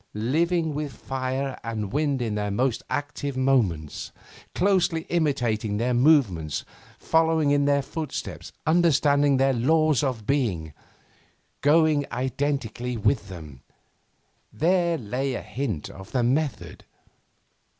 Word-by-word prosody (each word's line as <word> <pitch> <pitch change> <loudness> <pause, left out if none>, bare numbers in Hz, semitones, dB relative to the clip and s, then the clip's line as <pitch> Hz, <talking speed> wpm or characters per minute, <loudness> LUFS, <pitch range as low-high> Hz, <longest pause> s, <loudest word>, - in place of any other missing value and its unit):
Living 160 +8 +1
with 145 -1 -3
fire 130 +2 -3
and 110 -4 -4
wind 145 -4 0
in 110 -3 -2
their 105 0 -2
most 120 +4 0
active 145 0 -3
moments; 110 - 0 0.4
closely 185 -4 +2
imitating 120 -10 0
their 120 +3 0
movements, 120 - +2 0.3
following 160 -2 +2
in 145 0 +3
their 140 -1 +2
footsteps, 155 +2 -6
understanding 145 -4 +3
their 135 0 +3
'laws 155 +2 +3
of 125 -6 -2
being,' 100 - -1 0.9
going 155 0 +4
identically 125 -2 -2
with 105 -1 0
them 75 -8 -10 0.9
there 170 0 +2
lay 130 +3 -2
a - - -4
hint 115 - -4
of 95 0 -11
the 125 -2 +2
method. 125 - -1
135 Hz, 115 wpm, -25 LUFS, 115-150 Hz, 0.9 s, going